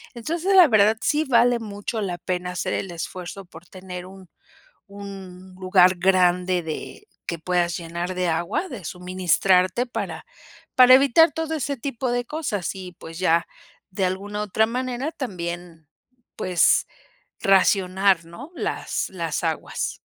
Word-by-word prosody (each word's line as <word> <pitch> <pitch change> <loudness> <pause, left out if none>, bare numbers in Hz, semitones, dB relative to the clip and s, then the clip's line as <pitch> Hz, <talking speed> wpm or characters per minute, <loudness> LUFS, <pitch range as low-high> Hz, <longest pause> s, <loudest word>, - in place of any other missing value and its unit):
Entonces 335 - -1
la 360 -4 +9
verdad 215 -1 +4
sí 300 +5 +1
vale 245 -2 +3
mucho 215 +1 -5
la 180 -3 -3
pena 180 0 -3
hacer 180 - -3
el 190 - -3
esfuerzo 180 +3 -7
por 175 - -15
tener 185 -1 -8
un 190 -1 -14 0.6
un 190 -2 -10
lugar 185 0 +4
grande 180 0 +2
de 160 - -7 0.2
que 170 - -3
puedas 175 0 0
llenar 170 +2 -4
de 180 0 0
agua, 175 - -1
de 215 - -8
suministrarte 185 - +1
para - - -5 0.5
para 255 0 +8
evitar 280 +5 +5
todo 320 0 -3
ese 280 -1 -2
tipo 250 0 -3
de 245 0 -1
cosas. 245 - -3
Y 185 -1 -8
pues, 165 -1 -11
ya 170 -2 +2 0.4
de 190 0 -1
alguna 200 +3 -3
otra 220 +2 +1
manera 255 +4 -3
también 175 - -6 0.5
pues 180 -2 +2 0.5
racionar, 190 -2 +3
¿no?, 235 - -11
las - - -3
las 170 -2 -3
aguas. 160 -2 -3
190 Hz, 140 wpm, -23 LUFS, 180-235 Hz, 0.6 s, la